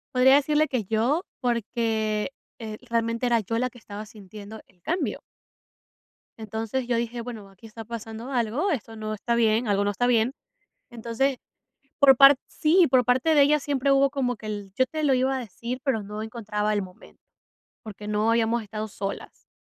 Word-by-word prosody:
Podría 260 +2 +6
decirle 300 +2 +3
que 255 -5 -1
yo, 230 - +1 0.2
porque, 225 -1 -1 0.3
eh, 215 -2 -6
realmente 230 +1 0
era 240 -1 +3
yo 225 +2 -3
la 255 +1 -1
que 245 - -15
estaba 210 -1 -8
sintiendo 210 0 -11
el 185 - -29
cambio. 360 +3 -2 1.2
Entonces, 225 +3 -4
yo 245 - +1
dije: 235 +1 -2
"Bueno, 225 -4 -8
aquí 195 +4 -15
está 225 +1 -9
pasando 230 +2 -7
algo, 250 - 0
esto 230 -6 -4
no 215 0 -4
está 235 +3 -1
bien, 225 0 +2
algo 200 -1 +2
no 205 - +1
está 225 +5 0
bien". 240 +1 +2 0.6
Entonces, 240 +3 -1 0.6
por 270 -3 +7
part 275 0 +9
sí, 335 +3 +3
por 250 -1 +4
parte 260 +6 +3
de 295 - +6
ella 295 +2 +4
siempre 280 -1 0
hubo 275 0 +4
como 265 -3 -1
que 215 0 -10
el: 205 -2 -5
"Yo 260 - +3
te 310 +3 -4
lo 280 -3 +4
iba 260 +1 +1
a - - -2
decir, 235 +2 -6
pero 255 -7 0
no 210 +1 -6
encontraba 215 -2 -2
el 205 - +1
momento, 185 -1 -13 0.6
porque 210 -1 -9
no 210 +1 +1
habíamos 230 0 +2
estado 215 +1 -5
solas", 195 0 -7
230 Hz, 185 wpm, -25 LUFS, 215-260 Hz, 1.2 s, part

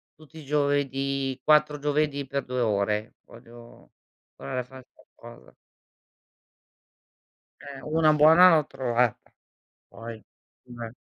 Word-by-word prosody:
tutti 155 +1 -18
i 145 - -12
giovedì 140 -2 -1
4 150 -1 +3
giovedì 145 -1 -1
per 140 0 -4
2 125 0 -3
ore, 105 +1 -1
voglio 115 - -16 0.4
imparare 70 - -5
a - - -8
fare 130 0 -15
qualcosa. 120 0 -17 2.1
Eh, 140 -1 -10
una 155 0 +2
buona 160 +5 +6
l'ho 150 -2 +1
trovata, 120 -2 -2 0.6
poi 115 0 -9 0.5
eh. 120 -2 -9
135 Hz, 110 wpm, -25 LUFS, 120-150 Hz, 2.1 s, buona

